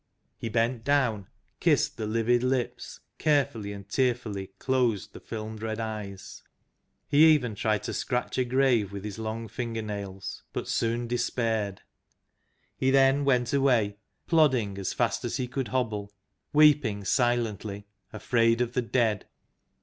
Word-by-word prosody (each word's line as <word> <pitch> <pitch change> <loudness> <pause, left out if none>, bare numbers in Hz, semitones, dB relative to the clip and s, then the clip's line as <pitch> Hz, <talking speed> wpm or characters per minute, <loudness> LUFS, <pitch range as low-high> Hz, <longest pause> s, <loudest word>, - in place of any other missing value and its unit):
He 115 - -5
bent 115 +1 0
down, 120 -9 +1 0.3
kissed - - +2
the 110 - -3
livid 115 +2 +2
lips, 125 -1 -2 0.2
carefully 140 -9 +1
and 100 -1 -9
tearfully 115 -4 -1
closed 125 -6 0
the - - -9
filmed 110 -1 -7
red 110 0 -3
eyes. 105 -3 -6 0.7
He 145 +2 +5
even 125 -7 +2
tried 105 0 0
to - - -4
scratch 125 0 -2
a - - +4
grave 125 -5 +2
with 100 -1 -6
his 105 0 -6
long 110 +1 -4
finger 115 0 -4
nails, 100 -2 -6
but - - -4
soon 115 +1 0
despaired. 115 -4 -1 0.9
He 130 - +1
then 135 +1 +4
went 125 -2 +2
away, 120 -7 +2 0.3
plodding 130 - +2
as 95 - -2
fast - - 0
as - - -2
he 125 - -2
could 130 0 -3
hobble, 105 -4 -2 0.4
weeping 145 -9 +4
silently, 110 -4 0 0.3
afraid 115 +1 +2
of 120 -1 -1
the 125 - +1
Dead. 115 -3 0
115 Hz, 140 wpm, -27 LUFS, 105-130 Hz, 0.9 s, He